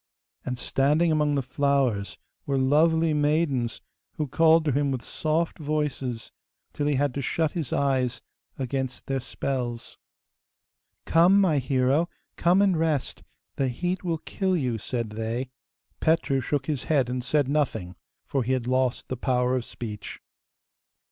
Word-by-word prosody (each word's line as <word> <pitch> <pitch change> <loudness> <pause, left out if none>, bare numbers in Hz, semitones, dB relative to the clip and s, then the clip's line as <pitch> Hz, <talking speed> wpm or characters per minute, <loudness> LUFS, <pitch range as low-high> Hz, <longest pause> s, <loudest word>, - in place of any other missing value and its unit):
And 125 -1 -3
standing 150 +7 +2
among 150 -1 +2
the 140 - 0
flowers 130 -6 0 0.3
were 140 -1 +1
lovely 160 +4 +3
maidens 145 -5 0 0.3
who 150 - -2
called 160 +3 +4
to 150 - +2
him 140 +1 +1
in - - -4
soft 160 +5 -1
voices, 145 -6 -2 0.4
till 145 - -1
he 145 - +2
had 140 0 +1
to 140 - -3
shut 160 +3 0
his 160 -8 -4
eyes 130 -3 +1 0.4
against 130 -1 -3
their 135 0 -1
spells. 125 -2 -4 1.1
'Come, 175 +4 +5
my 170 -7 +3
hero, 135 +5 +1 0.3
come 180 +3 +4
and 195 -3 +3
rest; 155 -4 -1 0.4
the 135 - +1
heat 175 +10 -2
will 170 -2 -1
kill 185 +3 -1
you,' 125 -7 -1
said 115 0 -3
they. 115 +4 -3 0.5
Petru 160 -4 +2
shook 140 +1 -1
his 145 -4 -2
head 140 -6 +2
and 125 0 -3
said 145 +1 +1
nothing, 135 -11 -1 0.3
for 135 - -1
he 130 +2 0
had 130 -2 -1
lost 130 0 0
the 130 - -4
power 125 0 +1
of 125 -2 -2
speech. 105 -3 -7
140 Hz, 150 wpm, -26 LUFS, 125-155 Hz, 1.1 s, Come